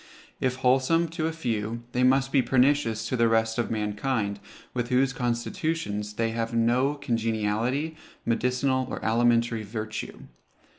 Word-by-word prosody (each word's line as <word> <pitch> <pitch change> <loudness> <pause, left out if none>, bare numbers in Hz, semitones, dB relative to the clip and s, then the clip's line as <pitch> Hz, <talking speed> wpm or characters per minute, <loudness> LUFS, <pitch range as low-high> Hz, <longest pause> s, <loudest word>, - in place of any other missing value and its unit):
If 130 -1 0
wholesome 130 +6 +2
to 160 -1 -2
a - - -1
few, 115 -6 -3
they 125 - 0
must 135 +1 +3
be 135 - +4
pernicious 125 -4 +2
to 130 - -1
the 115 -1 +3
rest 110 0 +1
of 120 - 0
mankind, 105 0 -1 0.3
with 120 -1 -2
whose 135 +1 +2
constitutions 120 - -2
they 115 +1 0
have 115 0 -2
no 125 +5 +2
congeniality, 115 +4 -1 0.3
medicinal 125 +2 +1
or - - -4
alimentary 115 0 +2
virtue. 110 +1 -5
120 Hz, 140 wpm, -26 LUFS, 115-135 Hz, 0.3 s, be